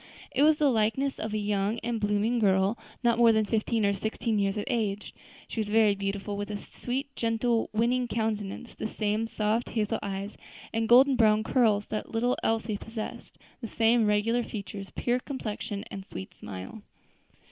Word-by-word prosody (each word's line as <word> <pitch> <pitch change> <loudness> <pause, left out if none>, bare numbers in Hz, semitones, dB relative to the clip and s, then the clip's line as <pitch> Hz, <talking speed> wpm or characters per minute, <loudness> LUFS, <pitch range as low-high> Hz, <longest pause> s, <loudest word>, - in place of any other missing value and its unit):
It 265 - 0
was 305 +1 +6
the 295 -3 +3
likeness 235 +5 +1
of 220 - -3
a 215 - -1
young 205 +1 0
and 230 -1 -2
blooming 210 +3 +1
girl, 195 0 +3 0.3
not 235 -1 +3
more 235 -1 +7
than 220 -1 +2
fifteen 220 0 0
or 200 - +3
sixteen 220 +2 -1
years 200 +1 0
of 205 - -1
age. 210 -3 -2 0.3
She - - -5
was 215 - 0
very 215 -1 +4
beautiful, 200 +1 -3
with 205 +1 -4
a 210 - -3
sweet, 270 +6 -5
gentle, 230 0 0
winning 240 +3 +1
countenance, 220 -1 -3
the - - -4
same 215 +1 -1
soft 220 +2 -1
hazel 215 -3 -1
eyes 200 +1 -5 0.4
and 225 0 0
golden 260 +2 +7
brown 215 -2 +4
curls 220 -5 +2
that 215 - -2
the - - -15
little 240 +2 +2
Elsie 220 -1 0
possessed; 225 +1 -7 0.2
the 230 - -4
same 225 0 +3
regular 215 +3 +2
features, 200 -3 -6
pure 245 +1 0
complexion, 215 -6 -5
and 195 - -6
sweet 95 - -8
smile. 100 - -8
220 Hz, 180 wpm, -28 LUFS, 205-235 Hz, 0.4 s, more